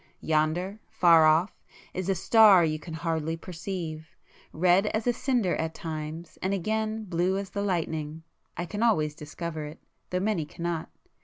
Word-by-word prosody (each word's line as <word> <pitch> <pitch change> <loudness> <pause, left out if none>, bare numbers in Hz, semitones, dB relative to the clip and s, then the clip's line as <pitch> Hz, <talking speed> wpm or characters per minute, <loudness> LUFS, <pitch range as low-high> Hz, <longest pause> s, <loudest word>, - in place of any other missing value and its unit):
Yonder, 160 +6 0
far 165 -3 +6
off, 160 +5 +2 0.3
is 185 +1 -3
a 195 - +2
star 200 -1 +6
you 155 -1 -1
can 160 +1 -8
hardly 160 0 -2
perceive; 165 -3 -6 0.4
red 180 +5 +3
as 220 +1 -1
a 245 - +3
cinder 240 -7 0
at 160 0 -3
times 160 +1 -6
and 190 +1 0
again 220 +3 -2
blue 180 0 0
as 195 -2 -5
the 200 - -2
lightning,—I 160 -2 -4
can 205 +5 -5
always 155 -11 +2
discover 155 +1 -6
it, 150 +3 -9 0.3
though 180 - -1
many 195 -4 0
cannot. 170 +1 -4
170 Hz, 155 wpm, -27 LUFS, 160-195 Hz, 0.4 s, far